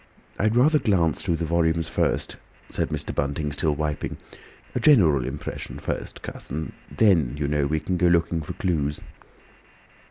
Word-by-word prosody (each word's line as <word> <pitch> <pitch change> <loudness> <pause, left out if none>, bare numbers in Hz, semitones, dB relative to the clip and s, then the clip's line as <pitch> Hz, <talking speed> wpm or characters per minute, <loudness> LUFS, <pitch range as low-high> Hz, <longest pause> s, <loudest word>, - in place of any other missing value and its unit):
"I'd 110 +2 +2
rather 150 +5 +5
glance 90 - +1
through 85 -4 0
the 85 - -2
volumes 80 0 +1
first," 80 - -1 0.4
said - - -1
Mr. - - -3
Bunting, 75 +1 -1
still 75 +1 0
wiping. 75 -1 -3 0.6
"A - - -1
general 80 - +5
impression 70 +2 -6
first, - - -5
Cuss, - - -7
and 80 +3 -4 0.2
then, 80 - +3
you 75 -1 -1
know, 75 -1 +1
we 80 +2 0
can 90 +4 -2
go 90 - +3
looking 85 -1 +2
for 75 - -6
clues." 75 -8 -1
80 Hz, 160 wpm, -25 LUFS, 75-90 Hz, 0.6 s, rather